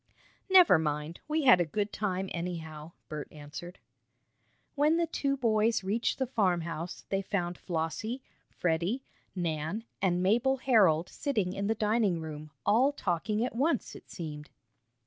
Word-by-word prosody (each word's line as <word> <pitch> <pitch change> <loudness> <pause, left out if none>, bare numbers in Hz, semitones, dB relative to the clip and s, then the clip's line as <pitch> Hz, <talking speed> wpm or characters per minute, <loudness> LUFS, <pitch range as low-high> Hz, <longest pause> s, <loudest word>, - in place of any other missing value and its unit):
"Never 365 - +7
mind, 150 +1 -2
we 310 0 0
had 245 -9 +7
a - - +4
good 200 +6 -2
time, 195 -2 -1
anyhow." 165 -2 -5
Bert 150 -1 -5
answered. 155 +4 -9 1.0
When 300 +3 +3
the 340 - +2
two 280 -3 -1
boys 225 -3 +2
reached 210 +5 0
the 265 - 0
farmhouse, 175 - -1
they 195 0 0
found 180 -3 -2
Flossie, 180 +11 -3 0.3
Freddie, 175 +10 -1 0.3
Nan 165 +3 -2 0.2
and 180 -2 +2
Mabel 240 +7 +3
Herold 195 - +4
sitting 210 -11 -1
in 200 0 -2
the 225 - +1
dining 210 -4 +1
room, 155 -1 -7 0.2
all 250 +7 +4
talking 210 - -1
at 255 - -4
once, 295 +7 0
it - - -13
seemed. 150 -3 -7
195 Hz, 145 wpm, -30 LUFS, 165-235 Hz, 1.0 s, Never